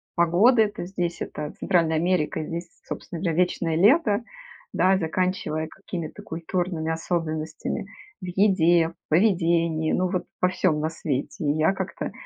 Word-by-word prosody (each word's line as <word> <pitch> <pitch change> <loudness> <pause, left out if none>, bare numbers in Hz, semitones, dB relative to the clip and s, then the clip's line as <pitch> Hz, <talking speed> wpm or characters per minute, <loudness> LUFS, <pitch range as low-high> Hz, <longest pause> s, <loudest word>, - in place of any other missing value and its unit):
погоды. 190 +8 +5
Это 205 -4 -4
здесь 175 -2 -3
это 150 0 -5
Центральная 165 -3 +2
Америка, 165 -2 0
здесь, 170 +2 -5 0.2
собственно, 170 - -6
вечное 170 -1 +1
лето, 210 - +4 0.5
да, 190 +1 +4
заканчивая 165 -2 -1
какими-то 180 +1 -7
культурными 170 -2 -2
особенностями 160 +3 -3 0.4
в 185 - -6
еде, 175 -3 +3
в 165 - -22
поведении, 170 -3 +2
ну 185 0 +1
вот 180 -1 -2 0.2
во 180 - +4
всём 185 -4 +1
на 155 - 0
свете. 155 -2 -3
И 145 - +3
я 160 +5 +3
как-то - - -4
170 Hz, 135 wpm, -25 LUFS, 160-185 Hz, 0.5 s, погоды